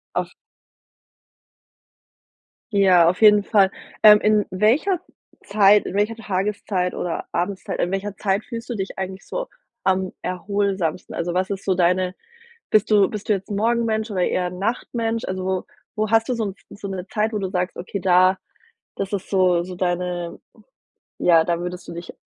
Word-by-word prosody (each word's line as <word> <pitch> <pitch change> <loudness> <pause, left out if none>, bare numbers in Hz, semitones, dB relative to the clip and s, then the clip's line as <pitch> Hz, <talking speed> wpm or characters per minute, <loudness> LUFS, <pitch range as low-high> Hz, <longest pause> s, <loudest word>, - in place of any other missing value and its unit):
Auf - - -1 2.4
Ja, 185 -4 +5
auf 185 - -3
jeden 210 -1 +7
Fall. 200 -3 +3 0.3
Ähm, 210 -1 +9
in 210 -1 +3
welcher 250 - +2 0.4
Zeit 205 0 +4
in 195 - -5
welcher 210 +2 +1
Tageszeit 195 -3 -2
oder 175 - -3
Abendzeit, 185 +3 -3
in 175 - +1
welcher 195 0 -3
Zeit 195 +1 0
fühlst 235 0 -7
du 240 - -2
dich 195 -2 -5
eigentlich 190 0 -5
so - - -4 0.4
am 190 -1 +1
erholsamsten? 190 -2 -2
Also, 175 +1 -2
was 185 +2 0
ist 195 -1 -5
so 190 - +2
deine 180 +1 +1 0.6
bist 215 0 +3
du 205 -2 +5
bist 210 +1 -7
du - - +5
jetzt 195 +1 -4
'n - - -1
Morgenmensch 225 0 0
oder 185 -3 0
eher 180 -1 0
'n 180 0 -7
Nachtmensch? 230 +2 -2
Also, 185 0 -2 0.3
wo 215 -1 -1
hast 225 0 +3
du - - +2
so 225 -2 -2
'n 195 -1 -5 0.2
so 200 - -7
'ne 190 -1 -5
Zeit, 215 +2 -1
wo - - 0
du 190 -2 -3
sagst, 180 -1 -2
okay, 190 +2 -5
da 185 0 +4 0.6
das 195 +1 -4
ist 195 - -5
so 180 -3 +3
so 180 +1 -7
deine 175 -1 -2 0.8
ja, 165 -2 +5
da 170 -1 -1
würdest 180 +1 -6
du - - -8
dich 170 +1 -8
195 Hz, 170 wpm, -22 LUFS, 180-210 Hz, 2.4 s, Ähm